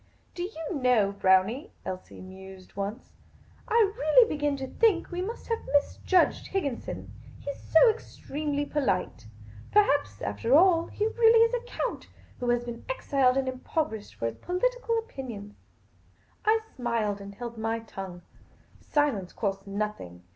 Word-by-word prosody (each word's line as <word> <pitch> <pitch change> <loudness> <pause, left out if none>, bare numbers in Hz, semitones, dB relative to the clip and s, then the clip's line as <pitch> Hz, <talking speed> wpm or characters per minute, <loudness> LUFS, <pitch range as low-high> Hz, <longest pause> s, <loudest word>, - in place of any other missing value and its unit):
" - - -37
Do 350 - -6
you 350 -3 -4
know, 235 -6 +4
Brownie," 200 - +2
Elsie 185 0 -7
mused 190 0 -12
once, 200 +5 -5 0.3
" - - -28
I 440 -3 +3
really 460 +3 +5
begin 295 -5 -1
to 270 - -4
think 390 - +2
we 355 0 -2
must 445 +6 -5
have 455 - +1
misjudged 295 +5 +2
Higginson. 285 -11 -3 0.3
He 280 - -4
's - - -16
so 320 +9 +8
extremely 295 -9 -2
polite. 195 - -1 0.4
Perhaps, 285 - +2
after 105 - +1
all, 335 0 +5
he 420 - -3
is 445 - -3
really 460 +1 +6
a 485 - -3
count, - - -3 0.3
who 245 - -1
has 240 0 +2
been 240 -1 -7
exiled 270 - +2
and 270 -1 0
impoverished 255 -3 -3
for - - -4
his 115 - -2
political 465 +5 0
opinions." 245 - -7 0.9
I 440 +1 +5 0.2
smiled, 230 -5 -1
and 200 0 -9
held 235 0 -7
my 225 +1 0
tongue. 190 -5 -8 0.6
Silence 275 -12 0
costs 195 -2 -3
nothing. 200 - -4
265 Hz, 150 wpm, -28 LUFS, -, 0.9 s, so